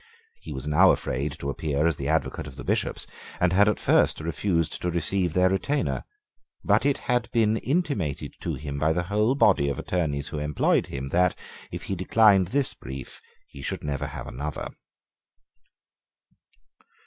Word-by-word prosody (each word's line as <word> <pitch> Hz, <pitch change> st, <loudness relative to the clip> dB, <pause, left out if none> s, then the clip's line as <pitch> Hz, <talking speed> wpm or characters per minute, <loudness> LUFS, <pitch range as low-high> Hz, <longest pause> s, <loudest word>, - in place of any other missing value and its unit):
He 80 Hz, -, -9 dB
was 65 Hz, -1 st, -5 dB
now 75 Hz, 0 st, +6 dB
afraid 70 Hz, +3 st, 0 dB
to 70 Hz, -3 st, -4 dB
appear 75 Hz, +1 st, -1 dB
as 85 Hz, -3 st, +2 dB
the 70 Hz, -, -4 dB
advocate 70 Hz, -, -1 dB
of 65 Hz, -, -10 dB
the -, -, -8 dB
Bishops, -, -, -1 dB, 0.3 s
and 90 Hz, 0 st, +2 dB
had 100 Hz, +2 st, +5 dB
at 105 Hz, -, -1 dB
first -, -, +3 dB
refused 85 Hz, 0 st, -1 dB
to 90 Hz, -, 0 dB
receive 85 Hz, +1 st, 0 dB
their 90 Hz, +1 st, +4 dB
retainer: 110 Hz, +10 st, -1 dB, 0.6 s
but -, -, +3 dB
it 140 Hz, -, +2 dB
had 125 Hz, -2 st, +1 dB
been 110 Hz, -2 st, +3 dB
intimated 135 Hz, -, -1 dB
to -, -, -2 dB
him 70 Hz, -2 st, -5 dB
by 80 Hz, +2 st, +2 dB
the 90 Hz, +1 st, 0 dB
whole 105 Hz, +7 st, +1 dB
body 90 Hz, -, +4 dB
of 70 Hz, -, -3 dB
attorneys 75 Hz, -5 st, -2 dB
who 75 Hz, -, -4 dB
employed 75 Hz, 0 st, +1 dB
him 70 Hz, 0 st, -5 dB
that, 90 Hz, +3 st, +2 dB, 0.3 s
if -, -, -6 dB
he -, -, -3 dB
declined 95 Hz, 0 st, +4 dB
this 135 Hz, +6 st, 0 dB
brief, 65 Hz, -1 st, -8 dB, 0.3 s
he 70 Hz, -, -12 dB
should -, -, -4 dB
never 70 Hz, -1 st, -2 dB
have -, -, -7 dB
another. 70 Hz, +4 st, -5 dB
85 Hz, 170 wpm, -26 LUFS, 70-100 Hz, 0.6 s, now